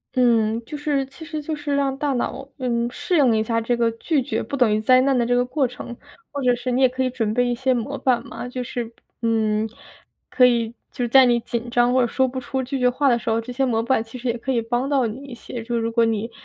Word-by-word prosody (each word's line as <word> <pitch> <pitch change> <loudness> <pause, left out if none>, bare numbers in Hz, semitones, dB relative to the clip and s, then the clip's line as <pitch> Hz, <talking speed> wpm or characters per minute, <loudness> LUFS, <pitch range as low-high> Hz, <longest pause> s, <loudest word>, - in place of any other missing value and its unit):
嗯， 230 -3 +3
就 300 - -7
是 290 -2 -1
其 275 +5 -13
实 310 -1 -5
就 305 +1 -4
是 295 -1 -2
让 275 -1 +1
大 285 0 -1
脑， 265 +2 -3
嗯， 240 -2 -1
适 355 - -2
应 260 -8 +4
一 220 - +1
下 230 +1 0
这 240 +1 0
个 230 -1 +2
拒 265 +4 -1
绝 225 -5 -2
不 280 +5 -4
等 235 -4 +3
于 215 - +1
灾 255 +4 +5
难 270 +1 +2
的 240 - +2
这 245 +1 +1
个 245 0 +2
过 260 +1 0
程。 245 0 -8 0.4
或 285 - -4
者 250 -1 +4
是 245 +1 -3
你 255 - +1
也 260 - +7
可 260 +1 -2
以 255 - +1
准 225 -4 -2
备 245 +1 +2
一 245 - 0
些 260 +2 +1
模 235 -3 -3
板 250 -3 +1
嘛， 245 - -7
就 250 0 -4
是， 240 -1 -5 0.3
嗯， 220 -1 +1 0.6
可 250 - +5
以 235 -2 +2 0.2
就 250 - -3
是 240 - 0
在 265 +1 +7
你 240 -1 +3
紧 235 +1 -4
张 245 0 +3
或 260 - +4
者 240 - +2
说 260 +2 +1
不 260 +1 -4
出 260 +1 -3
拒 265 +2 -3
绝 250 0 +4
话 275 +2 +2
的 240 - +3
时 - - -4
候， 225 0 +1
这 230 - -8
些 265 +2 0
模 230 -3 0
板 245 -2 +1
其 225 +2 -10
实 250 0 -3
也 235 - -1
可 265 +3 -3
以 235 -3 +1
帮 240 +4 -1
到 275 -4 +2
你 240 +5 -5
一 260 -3 -9
些， 235 0 -7
就 235 +1 -2
如 230 0 -1
果 230 0 +3
你 225 +1 -1
245 Hz, 305 characters per minute, -22 LUFS, 230-265 Hz, 0.6 s, 也